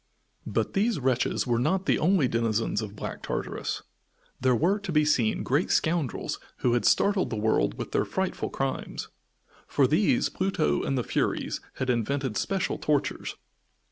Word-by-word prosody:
But - - -1
these 210 -1 +1
wretches 130 -2 +1
were 120 -2 +1
not 190 +9 +1
the - - +2
only 175 -4 +3
denizens 115 -2 0
of 105 -1 -6
Black - - -6
Tartarus. - - -3 0.6
There 130 -1 +3
were 185 - +2
to 200 -3 -5
be 150 -1 +3
seen 125 -7 +2
great 145 +7 +1
scoundrels 160 -6 0 0.3
who 120 - +4
had 120 - +1
startled 200 -6 +3
the 115 - -3
world 105 - +1
with - - -5
their - - +2
frightful - - -2
crimes. - - -3 0.6
For 140 - +3
these 210 - +3
Pluto 125 - 0
and 135 - -1
the 125 - 0
Furies - - -1
had 130 -1 -1
invented 130 +1 -1
special 195 - -1
tortures. 150 -2 -1
135 Hz, 160 wpm, -27 LUFS, 115-180 Hz, 0.6 s, who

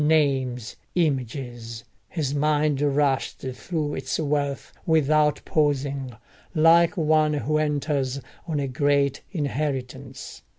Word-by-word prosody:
Names! 135 -6 +1 0.2
Images!—his 130 -1 -3
mind 150 -1 +2
rushed 140 -2 +1
through 145 +3 -3
its - - -2
wealth 145 -2 -1
without 155 -1 +3
pausing, 140 -4 0 0.4
like 165 +4 +5
one 155 -1 +3
who 155 +1 0
enters 145 -3 0 0.3
on 155 -3 -1
a 140 - -1
great 140 +1 +1
inheritance. 145 -6 -4
145 Hz, 95 wpm, -25 LUFS, 135-155 Hz, 0.4 s, like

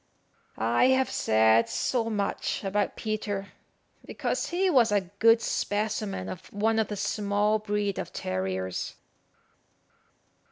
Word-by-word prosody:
I 115 - +2
have 260 0 +3
said 110 +1 +3
so 230 -3 0
much 205 -1 -2
about 200 +1 -1
Peter, 210 -2 -3 0.5
because - - -2
he 365 +2 +1
was 250 - +4
a 195 -4 0
good 230 0 +6
specimen 210 - -2
of 95 - -8
one 220 +2 +1
of 220 - +1
the 210 - -5
small 205 +1 +1
breed 210 -2 -2
of - - -5
terriers. 95 0 -3
205 Hz, 120 wpm, -27 LUFS, 175-220 Hz, 0.5 s, good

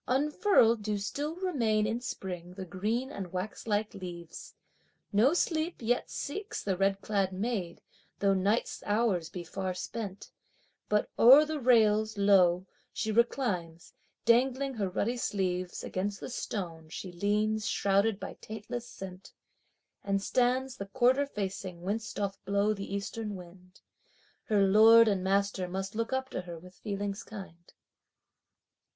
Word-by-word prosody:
Unfurled 270 - +3
do 210 0 -1
still 290 +10 -3
remain 240 - +1
in 225 +3 -1
spring 180 -6 -6
the 190 -1 -6
green 215 +9 -2
and 190 -9 -6
waxlike 210 +3 -2
leaves. 175 -4 -9 0.6
No 245 +11 +4
sleep 325 -1 0
yet 245 +1 0
seeks 395 +9 -5
the 195 -2 0
red 195 +1 +1
clad 200 -2 0
maid, 190 -3 -3 0.3
though 200 -1 +3
night's 200 +4 0
hours 205 -6 +1
be 180 - -6
far 185 +1 -4
spent, 205 0 -6 0.6
But 210 0 +1
o'er 270 +6 +9
the 310 0 -3
rails 220 -4 +3
lo, 185 -3 +4 0.3
she 220 - -2
reclines, 205 -8 0 0.3
dangling 260 +3 +3
her 205 -5 -2
ruddy 230 +6 -1
sleeves; 185 -5 -2
Against 200 +2 -3
the - - -7
stone 170 -9 -5
she 180 +3 -6
leans 210 +4 0
shrouded 200 +1 +2
by - - -6
taintless 225 +3 -6
scent, 190 -4 -10 0.7
And 195 0 +1
stands 250 +4 +1
the 200 - -6
quarter 260 +6 +3
facing 190 -6 -5
whence 215 +4 -2
doth 200 -1 -4
blow 200 +2 +1
the 200 -1 -7
eastern 205 +1 -4
wind! 180 0 -13 0.6
Her 205 -3 +3
lord 225 +3 +7
and 195 -3 +1
master 195 -1 +1
must 190 +2 -4
look 230 +2 -2
up 265 0 -1
to - - -3
her 175 -2 -8
with 180 +2 -13
feelings 200 0 -3
kind. 190 -5 -11
205 Hz, 140 wpm, -30 LUFS, 190-230 Hz, 0.7 s, o'er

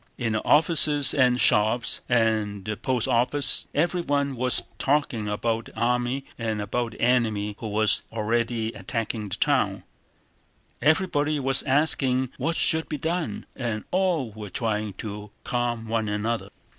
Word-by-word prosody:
In 115 -3 -1
the 110 - -1
offices 150 -3 +4
and 125 -3 +3
shops 110 +3 +2
and 110 -4 +1
at - - -19
the - - -3
post 125 +1 -1
office 125 +3 +3
everyone 145 -4 0
was 125 +1 0 0.2
talking 135 -6 0
about 110 +2 -1
the - - -11
army 125 +3 0
and 110 -2 -2
about 115 +3 -2
the - - -12
enemy 110 -4 +1
who 115 - -5
was 110 0 +2
already 115 +1 -1
attacking 110 +1 -4
the - - -3
town, - - 0 1.0
everybody 155 -2 +2
was 135 -1 +3
asking 130 -2 +1
what 165 +1 -1
should 160 -1 +3
be 150 - -3
done, 160 - -3
and 115 -4 -3
all 180 - 0
were 105 -1 -8
trying 105 0 -2
to 105 +1 -7
calm 120 -2 -2
one 110 -1 -1
another. 105 -1 -2
120 Hz, 145 wpm, -25 LUFS, 110-140 Hz, 1.0 s, offices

